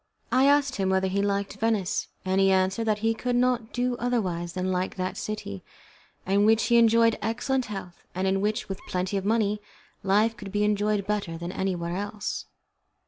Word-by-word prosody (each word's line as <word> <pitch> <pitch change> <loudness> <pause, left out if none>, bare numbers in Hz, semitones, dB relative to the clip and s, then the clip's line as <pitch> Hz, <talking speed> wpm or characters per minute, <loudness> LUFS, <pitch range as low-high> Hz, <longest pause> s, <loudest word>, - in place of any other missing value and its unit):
I 260 +2 +4
asked 285 -1 +3
him 190 -1 0
whether 190 0 +2
he 195 +1 0
liked 200 0 -1
Venice, 220 -3 0 0.2
and 190 +1 +2
he 195 - +5
answered 190 +4 +2
that 215 -2 +2
he 225 - +3
could 245 +2 -2
not 245 -2 +1
do 245 0 0
otherwise 185 -9 -1
than 185 0 -1
like 185 0 -1
that 185 0 -3
city, 155 - -5 0.6
in 200 +2 +3
which 220 +1 +4
he 235 - +4
enjoyed 230 0 +4
excellent 245 +4 -1
health, 195 -4 -8
and 185 +1 -1
in 195 0 +1
which, 215 +3 -1
with 195 0 -6
plenty 185 +2 -2
of 195 -1 -1
money, 210 -1 +1 0.4
life 210 +4 +2
could 200 -2 -9
be 205 +1 +1
enjoyed 210 -1 +1
better 200 -6 -2
than 170 +1 -5
anywhere 175 -3 -2
else. 205 +1 -4
205 Hz, 190 wpm, -26 LUFS, 190-225 Hz, 0.6 s, he